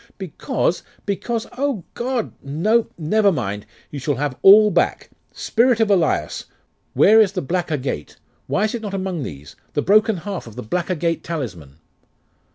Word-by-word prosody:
'Because - - -2 0.2
because 225 +3 -2
O 275 -9 -1
God! 240 -1 -2
No 210 +12 +1
never 200 +6 +2
mind! 105 - -4 0.2
You 145 - -5
shall 145 +1 -1
have 140 0 -2
all 210 +2 +8
back. 175 -1 0 0.2
Spirit 235 0 +1
of 220 -2 +2
Elias! 160 - +1 0.5
where 220 +2 +6
is 200 -3 +2
the - - -2
black 175 +3 -2
agate? 130 - -3 0.3
Why 200 - 0
is 215 - 0
it 235 - -4
not 205 -3 -4
among 185 -4 -3
these? 75 - -8 0.2
The - - 0
broken 215 +1 +4
half 195 - -6
of 110 - -11
the - - -6
black 175 - -2
agate 170 -2 -1
talisman! 95 - -6
180 Hz, 165 wpm, -21 LUFS, 140-215 Hz, 0.5 s, all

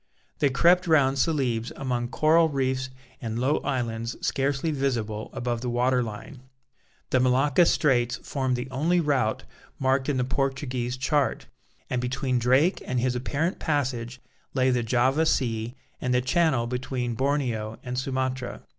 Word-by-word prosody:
They 145 - +3
crept 175 +7 +4
round 140 -4 +3
Celebes 130 -7 0
among 125 -3 -2
coral 160 +5 +3
reefs 130 -2 -1 0.3
and 115 -2 -4
low 130 +5 +2
islands 115 -4 -2
scarcely 140 +3 0
visible 115 -7 -2
above 120 -3 -3
the 125 - -2
water 125 +1 +2
line. 120 +4 -7 0.7
The 130 - +4
Malacca 130 +6 +3
Straits 125 -5 +2
formed 130 -3 -2
the 125 +1 -4
only 160 +7 +1
route 140 -9 0 0.3
marked 130 +1 +1
in 140 - 0
the 125 - +1
Portuguese 130 -2 -2
chart, 140 +2 0 0.4
and 125 -1 -1
between 125 0 -1
Drake 130 - +3
and 125 -1 0
his 125 +1 0
apparent 145 +8 -1
passage 130 -5 -2 0.4
lay 130 -1 +3
the 125 -1 +1
Java 130 +6 +2
Sea 115 -3 0 0.3
and 125 0 0
the 125 - +3
channel 140 -3 +2
between 125 0 -3
Borneo 120 -4 -1
and 125 0 -4
Sumatra. 130 -1 -3
130 Hz, 145 wpm, -26 LUFS, 120-140 Hz, 0.7 s, crept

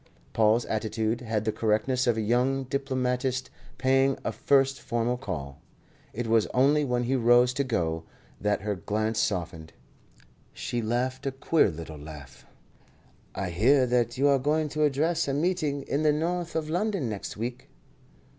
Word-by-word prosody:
Paul's 110 +2 +3
attitude 110 +1 -1
had 110 -3 -2
the 110 - +1
correctness 115 +5 0
of 120 -2 +2
a - - 0
young 125 +5 +1
diplomatist 130 -1 -2 0.3
paying 135 +1 +2
a - - 0
first 135 -1 +2
formal 120 +1 -1
call. 80 - -6 0.5
It 120 +2 -4
was 115 -1 +3
only 145 +4 +4
when 125 -3 0
he 130 +3 0
rose 120 0 +4
to 140 - 0
go 80 -10 -1 0.4
that 105 0 0
her 105 0 -1
glance 110 +4 -2
softened. 85 -4 -2 0.8
She 120 - -3
laughed 130 +4 -2
a - - 0
queer 135 -1 +2
little 80 -2 -8
laugh. 70 -4 -11 0.9
"I 95 -2 -3
hear 130 +10 +4
that 120 -1 0
you 140 +2 +3
are 140 -1 +4
going 150 +3 0
to 155 +1 +1
address 155 +4 +1
a 135 - 0
meeting 150 -3 0
in 140 - -1
the 155 -1 +4
North 170 +3 -2
of 160 -1 -1
London 180 - -1
next 105 -2 -5
week." 120 +3 -5
125 Hz, 160 wpm, -27 LUFS, 110-140 Hz, 0.9 s, only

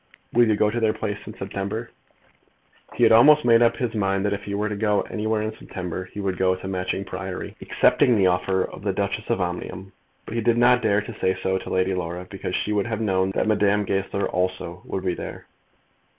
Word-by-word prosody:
Will 120 0 +5
you 110 - +3
go 105 +1 +2
to 120 - -1
their 110 -2 +1
place 105 -2 -3
in 110 - -9
September?" 100 +4 -4 1.0
He - - +1
had - - +6
almost 145 +6 +7
made 115 -1 +6
up 115 -1 +3
his 120 -2 -2
mind 95 -2 0
that 100 - +1
if 100 0 -5
he 100 - -3
went 105 +1 -1 0.4
anywhere 110 0 -1
in 110 0 -4
September 90 -3 -6
he 105 - -10
would 95 -3 -2
go 95 -1 +3
to 95 +1 -8
Matching 95 +1 -2
Priory, 95 0 -6
accepting 125 - +3
the 100 -3 +3
offer 95 +1 +2
of - - -8
the 100 -1 -1
Duchess 100 +2 -2
of 115 - +1
Omnium; 90 +1 -4 0.3
but - - -7
he 115 - -1
did 115 +1 +2
not 125 +1 +5
dare 105 0 +2
to 105 +1 -9
say 95 0 +1
so 95 0 0
to - - -8
Lady 95 +1 +1
Laura, 90 0 -4
because 95 -2 -4
she 105 - -1
would 105 0 0
have 110 -2 -2
known 95 -3 +1
that - - +1
Madame 105 -1 +2
Goesler 95 +1 -1
also 90 -1 -2
would 95 0 -4
be 90 - +1
there. - - -7
100 Hz, 220 wpm, -24 LUFS, 95-110 Hz, 1.0 s, almost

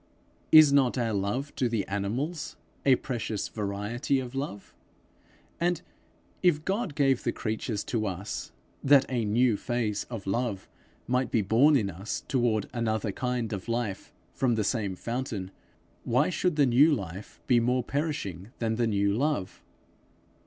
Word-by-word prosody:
Is 155 -3 +9
not 135 -3 +3
our 115 -3 0
love 105 +9 -2
to 125 - +1
the 110 -4 -1
animals 135 - -3 0.3
a 130 - +7
precious 115 -6 -3
variety 105 +6 -1
of 125 -1 -6
love? 135 -8 -5 0.9
And 175 0 0 0.6
if 160 -4 +2
God 195 -5 -1
gave 135 -4 +3
the - - +1
creatures 110 -1 -3
to 110 -3 -1
us, 95 +2 -5 0.3
that 140 -1 +6
a 120 -4 0
new 115 +1 +3
phase 115 -4 -2
of 115 -5 -7
love 100 -1 -2 0.4
might 125 +1 0
be 110 - +1
born 125 +10 +5
in 105 -7 +1
us 95 +5 -5
toward 120 -5 +1
another 110 -3 -1
kind 125 0 -2
of 100 +3 -5
life 115 -4 -2 0.2
from 125 -3 +1
the 110 - 0
same 100 -4 -1
fountain, 115 -4 -4 0.5
why 125 +8 +2
should 180 -2 0
the 145 -2 +4
new 135 +6 +5
life 95 -1 -8
be 120 -2 +4
more 125 +2 +1
perishing 135 - -3
than 110 -1 -1
the 120 -1 +2
new 100 -2 +1
love? 120 -6 -1
120 Hz, 150 wpm, -28 LUFS, 105-135 Hz, 0.9 s, Is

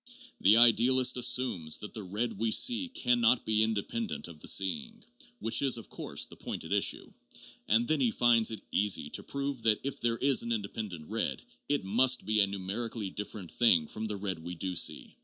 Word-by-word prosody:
The 105 +4 +5
idealist 125 +2 +5
assumes 120 -10 +1
that 105 - -8
the 110 - -5
red 105 +3 -4
we 115 0 0
see 245 - +3
can 125 - 0
not 115 +2 +3
be 110 0 +2
independent 110 - -2
of 85 -3 -13
the - - -4
seeing 225 - -1 0.3
(which 115 - 0
is, 135 -4 +2
of 115 - -10
course, - - -4
the - - -13
point - - -6
at - - -10
issue), - - +1 0.5
and 115 +4 +2
then 155 -1 +1
he 125 - +3
finds 115 -1 +3
it 110 -3 -7
easy 105 -1 0
to - - -3
prove 140 -2 -5
that 110 -2 +2
if 140 0 -5
there 115 -1 0
is 135 +1 +3
an 115 - -5
independent 100 -6 -5
red, - - -2 0.3
it 145 0 +1
must 125 +6 +2
be 110 +1 +1
a 100 - +4
numerically 100 +2 -5
dif 105 0 -5
ferent 95 -6 -8
thing 95 -10 +3
from 110 +7 -6
the 105 -2 -3
red 95 -3 -4
we 85 +2 -8
do 90 +2 -3
see. 85 - -1
110 Hz, 205 wpm, -30 LUFS, 100-125 Hz, 0.5 s, The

